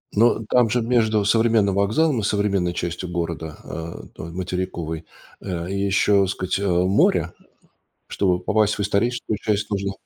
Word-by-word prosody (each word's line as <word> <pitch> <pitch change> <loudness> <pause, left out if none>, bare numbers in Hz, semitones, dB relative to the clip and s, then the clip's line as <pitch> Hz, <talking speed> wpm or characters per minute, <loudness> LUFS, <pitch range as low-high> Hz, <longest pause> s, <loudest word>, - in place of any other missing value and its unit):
Но 115 +1 +3
там 125 -2 +4
же, 120 +3 +1
между 110 -3 +2
современным 110 -2 +3
вокзалом 115 +8 +2
и - - -6
современной 100 -4 0
частью 85 +1 -4
города, 85 -2 -4
а, 80 0 -7
той 85 - -8
материковой, 85 -2 -4 0.4
а, 90 -3 -4
еще, 100 +1 +2
так 95 - -1
сказать, 95 0 -2
а, 100 - 0 0.2
море. 95 +3 +2 0.7
Чтобы 90 -3 0
попасть 105 +3 +2
в - - -6
историческую 110 +3 0
часть, 105 -2 -1
нужно 100 -1 -1
100 Hz, 150 wpm, -22 LUFS, 90-110 Hz, 0.7 s, там